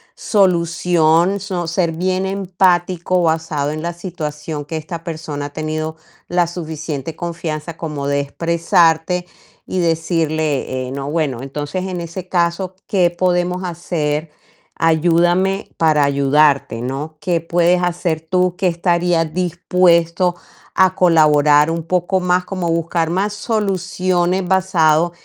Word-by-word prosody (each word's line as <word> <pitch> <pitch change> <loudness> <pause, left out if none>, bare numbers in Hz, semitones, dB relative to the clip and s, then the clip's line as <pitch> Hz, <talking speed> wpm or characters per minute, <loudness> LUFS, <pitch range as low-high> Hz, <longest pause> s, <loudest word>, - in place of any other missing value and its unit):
solución, 175 -1 +2
so 185 -3 -3
ser 170 0 0
bien 185 +3 -1
empático, 185 -2 +1
basado 160 -3 0
en 155 +1 -5
la 170 +1 -3
situación 155 -4 -5
que 160 - -6
esta 160 +2 -6
persona 155 -3 -5
ha - - -5
tenido 155 0 -3 0.3
la 175 0 +2
suficiente 160 -3 -5
confianza 165 -2 -5
como 150 -4 -4
de 140 0 +1
expresarte 165 +3 +1 0.4
y 185 - -3
decirle: 155 -6 -1
"Eh, - - -7
no, 140 +1 -4
bueno, 145 -6 -1
entonces 145 +7 -4
en 180 -2 -4
ese 170 +2 -7
caso, 175 +1 0
¿qué 180 -4 +3
podemos 180 +1 0
hacer? 160 -3 -2 0.5
Ayúdame 175 +4 +2
para 155 -3 +3
ayudarte, 140 -3 +2
¿no? 140 +5 -5
¿Qué 170 -1 0
puedes 175 +2 +2
hacer 175 -2 -1
tú? 180 0 +1
Que, 190 0 0
estarías 170 -2 +1
dispuesto 175 0 +2 0.4
a 185 -1 +3
colaborar 150 -3 +4
un 165 0 -2
poco 180 +2 0
más", 180 0 +1
como 185 -3 -3
buscar 165 0 0
más 195 +4 0
soluciones, 185 -4 0
basado 175 -3 +3
170 Hz, 125 wpm, -18 LUFS, 155-180 Hz, 0.5 s, colaborar